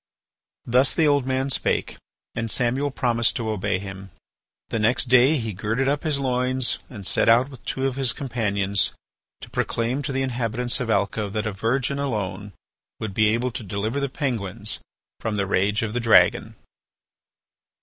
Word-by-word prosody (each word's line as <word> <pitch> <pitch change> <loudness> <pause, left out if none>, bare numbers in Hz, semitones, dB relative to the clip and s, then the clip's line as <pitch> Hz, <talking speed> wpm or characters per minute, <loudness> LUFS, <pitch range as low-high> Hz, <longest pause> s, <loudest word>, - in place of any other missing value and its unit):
'" - - -60
Thus 130 -1 +5
the 160 -2 +3
old 145 -3 +2
man 130 +1 0
spake, - - -1 0.4
and 115 0 -3
Samuel 130 +5 +1
promised 115 -4 +1
to 110 -3 -2
obey 105 -2 -1
him. 95 0 -8 0.6
The 115 - -1
next 120 +4 +2
day 130 +5 +5
he 110 -4 -3
girded 110 +8 -1
up 145 +1 +1
his 155 -4 0
loins 130 -1 0
and 105 -6 -9
set - - +3
out 120 +4 +5
with 130 -4 -13
two 130 - -2
of 135 -1 -1
his 135 -3 +3
companions 100 -6 0 0.5
to - - -10
proclaim 120 +4 -1
to 140 - -3
the 135 0 0
inhabitants 120 -1 0
of 125 -3 -3
Alca 100 0 0
that 105 +1 -3
a 105 - -1
virgin 125 +7 -1
alone 105 -6 -3 0.5
would 110 -3 -4
be 110 +2 +3
able 120 +4 0
to 120 - -5
deliver 105 +5 -2
the 140 -1 -1
Penguins 115 - -1 0.4
from 110 -1 -2
the 100 -1 0
rage 100 +3 +1
of 110 -1 -3
the 125 - 0
dragon. 115 -2 +4
115 Hz, 175 wpm, -24 LUFS, 105-130 Hz, 0.6 s, Thus